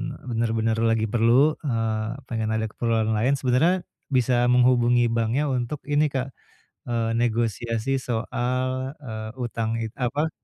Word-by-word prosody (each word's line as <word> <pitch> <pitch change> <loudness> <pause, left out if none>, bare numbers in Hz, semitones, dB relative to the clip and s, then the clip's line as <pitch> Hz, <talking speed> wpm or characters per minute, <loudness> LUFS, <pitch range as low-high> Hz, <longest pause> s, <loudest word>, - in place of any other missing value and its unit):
eee, - - -16
bener-bener 115 -1 0
lagi 115 -1 +1
perlu, 120 +7 +4
eee, 115 -4 -2
pengen 110 -2 -2
ada 110 0 -1
keperluan 115 -1 0
lain 115 +6 +2
sebenarnya, 140 +8 +2 0.2
bisa 125 -2 +2
menghubungi 120 -1 +4
banknya 115 +6 0
untuk 125 +3 -2
ini, 145 +1 +3
Kak, 135 -1 -3 0.5
eee, 115 -1 -1
negosiasi 115 +2 0
soal, 130 +1 -2
eee, 110 -4 -6
utang 115 -1 -2
it 110 - -3
apa 140 +5 0
120 Hz, 130 wpm, -24 LUFS, 115-130 Hz, 0.5 s, perlu